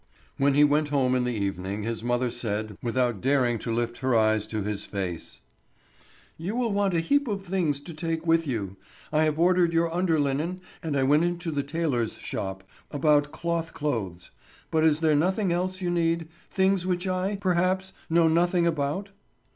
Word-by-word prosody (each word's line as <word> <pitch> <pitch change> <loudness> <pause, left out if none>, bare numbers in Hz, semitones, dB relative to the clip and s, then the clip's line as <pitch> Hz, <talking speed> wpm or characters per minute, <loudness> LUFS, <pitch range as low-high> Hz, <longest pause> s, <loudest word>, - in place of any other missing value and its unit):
When 140 0 +3
he 145 - +6
went 150 +1 +3
home 135 -3 +2
in 125 -1 +1
the 125 - -1
evening 100 0 -3
his 115 0 -3
mother 120 0 0
said, 110 -3 -3
without 120 -3 0
daring 125 -3 +2
to 115 - -4
lift 120 +1 -2
her 130 -2 +1
eyes 110 -1 +2
to 110 -2 -3
his 105 0 -3
face: 90 -4 -5 1.0
"You 185 +7 -3
will 240 -4 0
want 200 -2 +1
a - - +3
heap 285 +12 +1
of 200 -3 -3
things 175 -7 0
to 170 +3 -9
take 165 +1 -3
with 165 -1 +3
you. 100 -7 -3 0.4
I 155 +1 +4
have 155 -1 0
ordered 175 0 +3
your 165 0 +1
under 170 -3 +1
linen, 150 +6 -1 0.2
and 155 -3 -2
I 135 - +2
went 145 +4 +4
into 175 -1 -2
the 145 -2 0
tailor's 140 -6 -1
shop 95 -1 -5 0.3
about 145 0 +2
cloth 170 -1 -3
clothes; 105 - -3 0.4
but 160 -1 +2
is 155 -1 +3
there 155 -2 +3
nothing 185 +5 +1
else 185 +2 -1
you 175 -1 -1
need—things 170 +3 0
which 180 0 -1
I, 185 +2 -1
perhaps, 185 0 0 0.2
know 165 0 +4
nothing 170 +2 +2
about?" 160 +4 -1
155 Hz, 180 wpm, -26 LUFS, 120-175 Hz, 1.0 s, he